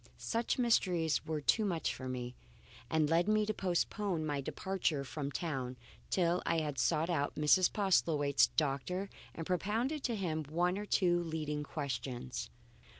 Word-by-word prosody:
Such 230 Hz, 0 st, -1 dB
mysteries 180 Hz, -, +2 dB
were 155 Hz, -1 st, -2 dB
too 220 Hz, -, +3 dB
much 175 Hz, -6 st, 0 dB
for 130 Hz, -1 st, -6 dB
me, 125 Hz, -1 st, -4 dB, 0.6 s
and 160 Hz, -1 st, +2 dB
led 165 Hz, +4 st, +3 dB
me 215 Hz, 0 st, +3 dB
to 215 Hz, -, -1 dB
postpone 185 Hz, -2 st, -1 dB
my 145 Hz, -2 st, -1 dB
departure 170 Hz, -2 st, -1 dB
from 140 Hz, +1 st, -4 dB
town 135 Hz, -6 st, -3 dB, 0.3 s
till 175 Hz, -1 st, +2 dB
I 165 Hz, -, +1 dB
had 150 Hz, -4 st, -2 dB
sought 160 Hz, +6 st, +2 dB
out 145 Hz, -4 st, 0 dB
Mrs. 150 Hz, +5 st, +4 dB
Postlethwaite's 155 Hz, -8 st, +3 dB
doctor 160 Hz, +7 st, -1 dB, 0.2 s
and 165 Hz, -, -5 dB
propounded 225 Hz, -, 0 dB
to 235 Hz, -, 0 dB
him 160 Hz, -6 st, -2 dB
one 175 Hz, +6 st, 0 dB
or 210 Hz, -, -5 dB
two 175 Hz, -3 st, +3 dB
leading 155 Hz, -3 st, -3 dB
questions. 130 Hz, -4 st, -4 dB
165 Hz, 150 wpm, -34 LUFS, 145-190 Hz, 0.6 s, Mrs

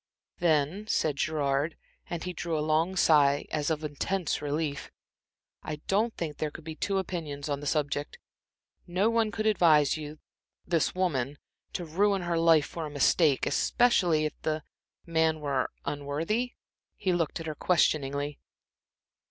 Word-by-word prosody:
"Then," 170 Hz, +4 st, +1 dB
said 150 Hz, -8 st, +1 dB
Gerard, 145 Hz, 0 st, 0 dB, 0.3 s
and 170 Hz, -2 st, -4 dB
he 180 Hz, -, -4 dB
drew 170 Hz, -2 st, -2 dB
a 150 Hz, -, -1 dB
long 160 Hz, +4 st, +1 dB
sigh 145 Hz, -5 st, +4 dB
as 150 Hz, -1 st, -1 dB
of 155 Hz, -1 st, -1 dB
intense 155 Hz, +4 st, -2 dB
relief, 145 Hz, 0 st, -2 dB, 0.7 s
"I 155 Hz, -, -4 dB
don't 215 Hz, +4 st, +2 dB
think 155 Hz, -4 st, -4 dB
there 155 Hz, -, -1 dB
could 155 Hz, -, -11 dB
be 160 Hz, 0 st, -6 dB
two 195 Hz, +4 st, -1 dB
opinions 160 Hz, -7 st, -4 dB
on 140 Hz, -1 st, -1 dB
the 145 Hz, -, -6 dB
subject. 145 Hz, -1 st, -1 dB, 0.7 s
No 190 Hz, +6 st, +2 dB
one 230 Hz, -1 st, +2 dB
could 215 Hz, +1 st, -3 dB
advise 160 Hz, -9 st, +4 dB
you 150 Hz, 0 st, -7 dB, 0.5 s
this 170 Hz, -1 st, +1 dB
woman 145 Hz, -7 st, 0 dB, 0.4 s
to 175 Hz, -, -3 dB
ruin 195 Hz, +4 st, +1 dB
her 170 Hz, -1 st, 0 dB
life 165 Hz, -3 st, +5 dB
for 165 Hz, -2 st, -5 dB
a -, -, -7 dB
mistake, 145 Hz, 0 st, +3 dB
especially 180 Hz, -11 st, +3 dB
if 155 Hz, -, -2 dB
the 155 Hz, -1 st, -1 dB, 0.4 s
the 170 Hz, -, -14 dB
man 160 Hz, -1 st, +2 dB
were 140 Hz, -3 st, -1 dB, 0.2 s
unworthy?" 160 Hz, -, -2 dB, 0.4 s
He 185 Hz, -, 0 dB
looked 170 Hz, -2 st, -1 dB
at 165 Hz, -, -6 dB
her 155 Hz, -, -3 dB
questioningly. 145 Hz, -3 st, +1 dB
155 Hz, 155 wpm, -29 LUFS, 145-175 Hz, 0.7 s, life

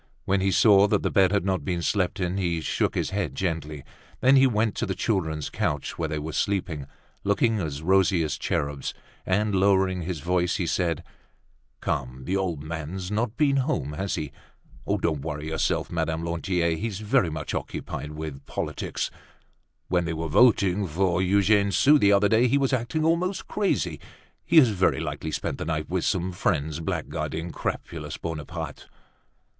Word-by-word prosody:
When 95 Hz, 0 st, +1 dB
he 95 Hz, -, +2 dB
saw 100 Hz, +1 st, +6 dB
that -, -, +1 dB
the -, -, 0 dB
bed 95 Hz, -1 st, +4 dB
had 100 Hz, -2 st, +1 dB
not 95 Hz, -1 st, 0 dB
been 90 Hz, -3 st, -2 dB
slept 90 Hz, +1 st, 0 dB
in, 90 Hz, 0 st, -1 dB
he 85 Hz, -3 st, 0 dB
shook 80 Hz, -, -1 dB
his -, -, -1 dB
head 100 Hz, -1 st, -2 dB
gently; 80 Hz, -5 st, -3 dB, 0.4 s
then 130 Hz, +2 st, +5 dB
he 135 Hz, 0 st, +6 dB
went 110 Hz, -3 st, +1 dB
to -, -, -1 dB
the 95 Hz, -, -2 dB
children's 80 Hz, -7 st, -1 dB
couch 75 Hz, -2 st, -2 dB
where 80 Hz, -2 st, -1 dB
they 80 Hz, -, -2 dB
were 75 Hz, +1 st, -5 dB
sleeping, 85 Hz, -8 st, -1 dB, 0.4 s
looking 110 Hz, +2 st, +2 dB
as 75 Hz, -4 st, -4 dB
rosy 95 Hz, -1 st, +3 dB
as 75 Hz, -, -1 dB
cherubs, 70 Hz, -1 st, -2 dB, 0.3 s
and, 105 Hz, +3 st, +1 dB
lowering 95 Hz, -1 st, +3 dB
his 85 Hz, -1 st, -4 dB
voice, 90 Hz, +2 st, +1 dB
he 90 Hz, -, -1 dB
said, 85 Hz, -1 st, 0 dB, 0.8 s
"Come, 65 Hz, -3 st, -3 dB
the 95 Hz, -, -1 dB
old 90 Hz, -7 st, -1 dB
man's 85 Hz, +4 st, -5 dB
not 110 Hz, +2 st, -1 dB
been 140 Hz, -2 st, +3 dB
home, 80 Hz, -, -1 dB
has 95 Hz, +6 st, -2 dB
he? 75 Hz, -3 st, -4 dB, 0.6 s
Don't 80 Hz, -4 st, 0 dB
worry 75 Hz, -1 st, -4 dB
yourself, 80 Hz, -, -1 dB
Madame 80 Hz, 0 st, -1 dB
Lantier. 85 Hz, 0 st, 0 dB
He's 105 Hz, 0 st, -3 dB
very 105 Hz, -4 st, +2 dB
much 75 Hz, -1 st, -5 dB
occupied 75 Hz, +1 st, -5 dB
with 75 Hz, -3 st, -6 dB
politics. -, -, -3 dB, 0.8 s
When 90 Hz, -1 st, +1 dB
they 85 Hz, -, -2 dB
were 80 Hz, +1 st, -3 dB
voting 100 Hz, 0 st, +4 dB
for 90 Hz, +2 st, +1 dB
Eugene 100 Hz, +2 st, +3 dB
Sue 145 Hz, +8 st, +5 dB
the 100 Hz, -4 st, +5 dB
other 100 Hz, +1 st, +5 dB
day, 115 Hz, +3 st, +4 dB
he 140 Hz, -, +3 dB
was 135 Hz, -1 st, +1 dB
acting 130 Hz, +6 st, 0 dB
almost 175 Hz, +4 st, 0 dB
crazy. 90 Hz, -, 0 dB, 0.4 s
He 170 Hz, -, +2 dB
has 135 Hz, -7 st, +8 dB
very 95 Hz, -3 st, +2 dB
likely 80 Hz, -, -4 dB
spent -, -, -3 dB
the -, -, -3 dB
night 75 Hz, 0 st, -3 dB
with 90 Hz, -2 st, 0 dB
some 95 Hz, -2 st, 0 dB
friends 80 Hz, -4 st, -1 dB
blackguarding 85 Hz, +1 st, -3 dB
crapulous -, -, -4 dB
Bonaparte." 80 Hz, -4 st, -6 dB
90 Hz, 175 wpm, -26 LUFS, 80-100 Hz, 0.8 s, has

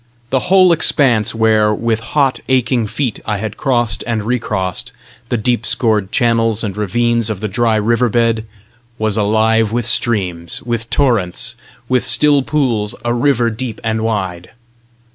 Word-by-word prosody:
The 130 Hz, +6 st, -1 dB
whole 185 Hz, -1 st, +6 dB
expanse 125 Hz, -9 st, +2 dB
where, 110 Hz, -1 st, +3 dB
with 115 Hz, +1 st, -1 dB
hot, 135 Hz, +3 st, 0 dB
aching 125 Hz, -3 st, +1 dB
feet, 125 Hz, 0 st, -3 dB
I 105 Hz, -, -2 dB
had 110 Hz, +1 st, -5 dB
crossed 120 Hz, -6 st, 0 dB
and 115 Hz, -3 st, -1 dB
recrossed 105 Hz, -6 st, -2 dB, 0.4 s
the 120 Hz, -, 0 dB
deep 115 Hz, +1 st, 0 dB
scored 110 Hz, -5 st, 0 dB
channels 115 Hz, -3 st, +1 dB
and 100 Hz, -3 st, -3 dB
ravines 115 Hz, +2 st, 0 dB
of 105 Hz, -3 st, -3 dB
the 110 Hz, -, -3 dB
dry 110 Hz, +3 st, +1 dB
river 115 Hz, +3 st, +1 dB
bed, 115 Hz, -1 st, 0 dB, 0.5 s
was 110 Hz, -2 st, 0 dB
alive 110 Hz, +1 st, +2 dB
with 120 Hz, 0 st, -1 dB
streams, 95 Hz, -8 st, 0 dB
with 115 Hz, -1 st, -3 dB
torrents, 115 Hz, -11 st, 0 dB, 0.3 s
with 130 Hz, -1 st, +1 dB
still 145 Hz, -2 st, +4 dB
pools 125 Hz, -8 st, -1 dB
"a 120 Hz, -, +1 dB
river 120 Hz, -2 st, +1 dB
deep 115 Hz, -1 st, -5 dB
and 110 Hz, -1 st, -1 dB
wide"! 95 Hz, -6 st, -3 dB
115 Hz, 150 wpm, -16 LUFS, 105-120 Hz, 0.5 s, whole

